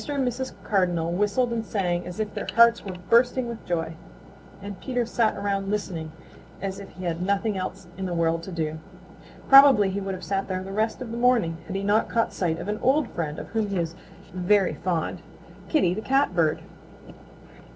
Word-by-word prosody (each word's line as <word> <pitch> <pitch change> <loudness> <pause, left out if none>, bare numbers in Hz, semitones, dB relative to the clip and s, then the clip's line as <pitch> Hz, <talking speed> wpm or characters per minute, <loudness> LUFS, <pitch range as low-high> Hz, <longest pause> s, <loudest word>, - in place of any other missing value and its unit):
and 275 -3 0
Mrs. 255 +2 -3
Cardinal 175 -5 +1
whistled 210 +6 +1
and 225 -1 -1
sang 180 -5 -1
as 180 +3 -7
if 215 -1 -2
their - - -5
hearts 235 0 +6
were 190 -2 -6 0.2
bursting 245 +1 +4
with 235 -1 -7
joy, 165 -2 -1 0.7
and 200 -1 -8
Peter 245 -2 -1
sat 225 -1 +1
around 195 -1 -1
listening 180 -6 -3 0.5
as 195 0 -4
if 200 - -9
he 185 - -9
had 170 -1 -2
nothing 200 +3 0
else 190 0 -5
in 190 - -2
the 180 - -3
world 165 0 +1
to 190 - -8
do. 160 -2 -3 0.7
Probably 270 -8 +8
he 200 +1 -3
would 195 -1 -3
have 185 - -10
sat 195 0 -2
there 185 -1 -3
the 195 - -7
rest 220 +4 -1
of 230 - -8
the 230 - -4
morning 230 -10 +2
had 190 - -5
he 195 - -2
not 205 +2 +2
caught 230 -1 0
sight 165 -3 -1
of - - -6
an 210 +1 -2
old 270 0 +2
friend 155 -3 -3
of - - -7
whom 220 -2 -1
he 200 -1 -2
is 165 -1 -1 0.4
very 185 +1 +2
fond, 175 -2 -2 0.5
Kitty 275 - +3
the 215 - -4
Catbird. 185 - +1
195 Hz, 200 wpm, -25 LUFS, 175-230 Hz, 0.7 s, Probably